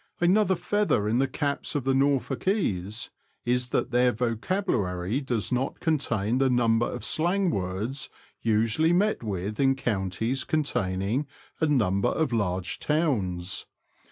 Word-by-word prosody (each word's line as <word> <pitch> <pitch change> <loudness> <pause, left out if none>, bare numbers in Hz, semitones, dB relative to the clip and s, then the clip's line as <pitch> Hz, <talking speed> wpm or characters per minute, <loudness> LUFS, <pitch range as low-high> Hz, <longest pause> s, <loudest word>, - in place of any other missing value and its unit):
Another 190 +2 +3
feather 205 - +1
in 115 +3 +2
the 135 - +2
caps 140 +3 -2
of 145 - 0
the 135 +1 +2
Norfolkese, 135 - 0 0.3
is 125 0 0
that 125 - 0
their 125 0 +4
vocabulary 115 - -1
does 120 -8 -2
not 130 +2 -1
contain 125 - 0
the 135 -1 +3
number 120 -2 +3
of 120 -3 -4
slang 180 +5 +1
words 100 +8 -2 0.3
usually 115 +9 +2
met 205 +4 +2
with 105 -1 -4
in 135 -1 +4
counties 115 +1 -1
containing 115 -3 -1 0.3
a 160 - +2
number 100 -9 +2
of 155 -6 0
large 95 -5 -1
towns. 100 - 0
125 Hz, 130 wpm, -27 LUFS, 105-145 Hz, 0.3 s, their